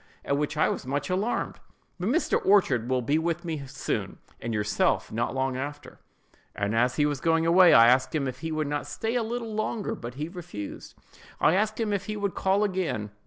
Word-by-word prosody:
(at 140 - +1
which 150 +1 -2
I 155 - +4
was - - -3
much 145 +4 -2
alarmed), 200 +6 -1 0.4
"but 180 +4 -1
Mr. 320 +8 +1
Orchard 155 - +3
will 130 -1 +1
be 145 +6 +2
with 170 +1 -2
me 155 -5 -4
soon, 135 +1 -3 0.2
and 115 - -3
yourself 105 -1 0
not 120 +4 -2
long 130 0 0
after." 145 +3 -6 0.6
As 115 +5 +1
he 150 - +2
was 145 -2 -1
going 165 0 +2
away, 175 +1 +7
I 115 - +9
asked 130 +5 +3
him 140 -3 0
if 130 0 -5
he 160 +3 -4
would 155 -1 -1
not 145 0 -3
stay 220 +10 -3
a 245 - +1
little 230 0 -4
longer, 215 0 -2
but 120 +1 -7
he 150 +3 -3
refused. 170 - -8 0.4
I - - +4
asked 215 +3 0
him 215 -2 0
if 200 -1 -2
he 215 0 -3
would 200 -2 -1
call 195 +2 +1
again. 180 - -2
155 Hz, 210 wpm, -27 LUFS, 130-195 Hz, 0.6 s, I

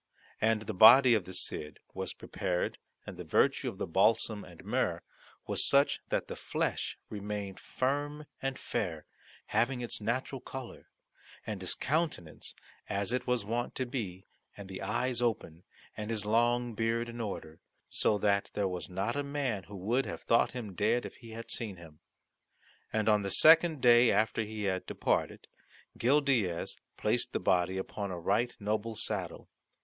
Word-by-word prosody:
And 110 0 +2
the 110 - -4
body 125 +6 +9
of 105 -5 +2
the 95 - -8
Cid 75 -4 -3 0.2
was - - -4
prepared 90 -2 -2 0.3
and - - -8
the - - -6
virtue - - +2
of - - -9
the - - -2
balsam 105 +4 +2
and 85 -2 -13
myrrh - - 0 0.4
was - - +1
such 140 +1 +4
that - - 0
the - - -5
flesh - - -2
remained 100 -2 -4
firm 145 +3 -2 0.2
and 135 -1 -2
fair, 90 -10 -3 0.5
having 125 +2 +2
its 120 -2 -4
natural 130 +4 -2
colour 130 -2 -8 0.6
and 105 -3 -4
his 90 - -2
countenance 150 - -2 0.3
as 100 +4 -1
it 125 -1 -1
was 125 -4 +1
wont 120 +3 -2
to 130 - -1
be, 105 -7 -5 0.3
and 100 -2 -9
the 95 - -6
eyes 120 +4 -1
open, 95 -8 -2 0.3
and 105 0 -5
his 110 -2 -1
long 120 +2 +2
beard 115 +2 0
in 120 0 -6
order, 80 -7 -5 0.3
so 105 - +1
that 100 -1 +1
there 100 -2 +1
was 90 0 -5
not 95 +6 -2
a 145 - 0
man 140 -8 -2
who 100 - -10
would 115 +8 0
have - - -6
thought 115 - +3
him 115 -6 -6
dead 110 +6 +1
if - - -8
he 115 -2 -13
had 115 +1 -7
seen 105 -5 -4
him. 80 -3 -14 0.9
And 110 0 0
on 105 -1 +5
the 100 - -2
second 160 - +6
day 120 0 +7
after 110 +2 +2
he 110 -1 -4
had 95 -2 -1
departed, - - -1 0.5
Gil 140 +5 +3
Diaz 110 -12 0 0.2
placed - - 0
the - - 0
body 90 +1 +2
upon 100 +1 -4
a 90 -2 -4
right 105 +8 +1
noble 110 +2 -2
saddle. - - -4
110 Hz, 170 wpm, -31 LUFS, 100-120 Hz, 0.9 s, body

